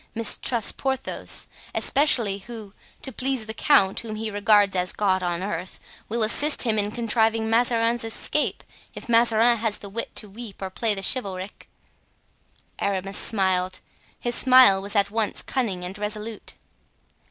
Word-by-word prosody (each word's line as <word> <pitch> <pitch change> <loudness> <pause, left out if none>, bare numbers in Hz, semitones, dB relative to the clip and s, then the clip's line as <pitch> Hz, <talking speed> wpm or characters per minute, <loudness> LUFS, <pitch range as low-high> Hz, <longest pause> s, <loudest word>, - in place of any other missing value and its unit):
Mistrust 230 0 0
Porthos, 265 -1 -3 0.3
especially, 235 -9 +4
who, 215 -1 -10 0.3
to 265 - 0
please 260 -3 -2
the 220 - -6
count 195 -6 +3
whom 220 -2 -6
he 220 0 -4
regards 205 -1 +3
as 180 0 0
God 190 -3 0
on 175 0 -3
earth, 185 -2 -5 0.3
will 230 +1 -1
assist 290 +7 +3
him 220 -3 +1
in 205 0 -1
contriving 225 0 0
Mazarin's 230 0 +2
escape, 225 0 -2 0.3
if - - -9
Mazarin 235 0 +3
has 220 -2 -2
the 200 - -10
wit 230 +4 -6
to 210 - 0
weep 210 +1 -10
or 190 -1 -6
play 220 +2 0
the 195 - -5
chivalric." 195 -5 -1 1.1
Aramis 195 0 -1
smiled; 185 -3 0 0.4
his 240 - -3
smile 255 -7 +5
was 200 +2 -6
at 200 0 +2
once 220 -1 -1
cunning 210 -9 -3
and 180 +2 -7
resolute. 210 +1 -6
215 Hz, 150 wpm, -23 LUFS, 195-235 Hz, 1.1 s, smile